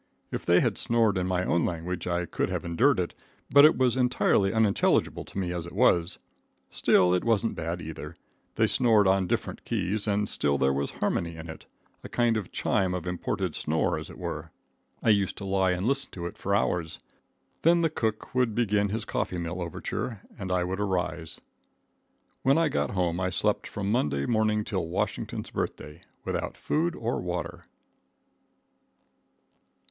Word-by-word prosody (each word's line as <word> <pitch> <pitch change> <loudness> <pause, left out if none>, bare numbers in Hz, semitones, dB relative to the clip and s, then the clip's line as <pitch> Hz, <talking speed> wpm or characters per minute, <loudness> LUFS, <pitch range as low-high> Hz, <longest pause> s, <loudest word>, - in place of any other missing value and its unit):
If - - -5
they 85 +1 +5
had - - 0
snored 115 -3 +2
in 90 -1 0
my 90 0 0
own 85 - +2
language 85 +1 -3
I 90 0 0
could - - -2
have - - -3
endured 120 +11 +3
it, 90 - -2 0.4
but 140 +1 +9
it 155 - +5
was 130 -2 +3
entirely 125 -6 +2
unintelligible 110 -3 +2
to - - -11
me 90 -2 -1
as 85 -1 -4
it - - -10
was. 95 -5 +3 0.5
Still, 90 -1 +4
it 90 - +1
wasn't 115 -1 +1
bad 85 +2 -3
either. 80 0 -7 0.4
They - - +3
snored 110 -5 +4
on 95 -1 +3
different - - -2
keys, 105 0 -1
and 105 0 +1
still 70 -5 +1
there 65 0 +2
was 70 +1 -1
harmony 85 -1 -2
in 80 0 -8
it 80 - -10 0.4
a - - -8
kind 120 -1 +2
of 105 -5 -3
chime 95 -2 0
of 90 - -4
imported 90 -1 -2
snore 80 +1 0
as - - -9
it - - -11
were. - - -5 0.5
I - - +3
used 100 -3 +1
to 100 - -6
lie 95 -1 +2
and 90 +1 -1
listen 140 +3 +1
to 85 -2 -5
it 85 - -5
for 100 +1 -1
hours. 85 -5 -1 0.6
Then 170 +1 +4
the 165 - +3
cook 110 -7 -2
would 125 -4 +1
begin 105 -3 +2
his 110 +2 -3
coffee 90 - -2
mill 85 +1 -4
overture 95 +5 -4
and 95 -2 -5
I 90 -1 +2
would 95 +2 -3
arise. 90 -5 -2 1.0
When 135 +3 +4
I 165 -2 +3
got - - 0
home 90 -2 0
I 95 0 0
slept 90 - 0
from 100 0 -3
Monday 70 - +1
morning 110 -2 +1
till 95 -5 -2
Washington's 85 - -3
Birthday, 75 0 -4 0.2
without - - -3
food 170 +3 0
or 115 +1 -2
water. 90 0 -4
95 Hz, 180 wpm, -27 LUFS, 85-110 Hz, 1.0 s, but